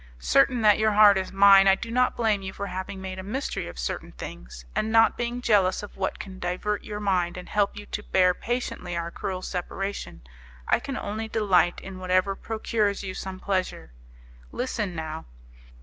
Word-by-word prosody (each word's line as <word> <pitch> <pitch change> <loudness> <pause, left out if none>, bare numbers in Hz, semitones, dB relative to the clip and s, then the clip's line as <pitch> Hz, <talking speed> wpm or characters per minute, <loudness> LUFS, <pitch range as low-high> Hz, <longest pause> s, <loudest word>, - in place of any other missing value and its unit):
Certain 135 - +3
that 210 -1 +6
your 215 0 +3
heart 205 -1 +7
is 190 -1 -2
mine, 195 0 +7
I 195 - +6
do 230 +3 -7
not 250 +1 +2
blame 220 -4 +1
you 190 0 -6
for 200 - -5
having 190 +1 -5
made 190 0 -6
a - - -6
mystery 240 - -3
of 85 - -9
certain - - -4
things, - - -9
and 220 - 0
not 225 0 +5
being 240 +1 -3
jealous 200 -4 +3
of 205 - -9
what 190 -1 -2
can 190 -2 -9
divert 185 +4 -2
your 210 -1 -6
mind 180 -4 0
and 180 - -8
help 205 -1 0
you 205 - -8
to 210 - -5
bear 185 -3 +3
patiently 220 -6 -3
our 170 0 -3
cruel 185 0 -4
separation, 195 - -5 0.5
I - - +3
can 270 -2 -5
only 215 +2 -4
delight 185 -6 +2
in 190 -1 -9
whatever 185 +1 +1
procures 215 -2 -1
you 190 -1 -4
some 190 0 -6
pleasure. 185 - -2 0.6
Listen 215 -7 -3
now. 160 0 -5
195 Hz, 190 wpm, -26 LUFS, 185-215 Hz, 0.6 s, heart